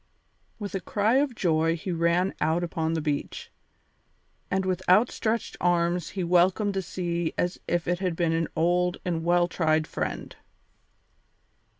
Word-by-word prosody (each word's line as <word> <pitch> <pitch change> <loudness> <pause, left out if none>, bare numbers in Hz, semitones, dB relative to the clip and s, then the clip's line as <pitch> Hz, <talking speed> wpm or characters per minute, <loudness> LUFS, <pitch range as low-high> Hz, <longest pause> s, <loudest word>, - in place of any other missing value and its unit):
With 205 -2 -6
a 195 - -1
cry 215 +6 +1
of 275 -3 +1
joy 165 -3 +2
he 175 +3 -5
ran 170 +3 +1
out 165 +2 +1
upon 165 -1 -1
the 160 - -1
beach, 145 -2 -3 1.0
and 190 0 0
with 185 -1 -1
outstretched 225 +3 +2
arms 175 0 +1
he 185 - 0
welcomed 180 +4 +3
the 195 - -1
sea 170 -2 -3
as 175 0 -1
if 175 -1 -1
it 175 0 0
had 185 -3 -1
been 165 -1 +1
an 165 0 0
old 175 +2 +1
and 165 -2 -1
well 175 +1 +3
tried 155 -3 +1
friend. - - -4
175 Hz, 155 wpm, -26 LUFS, 165-185 Hz, 1.0 s, welcomed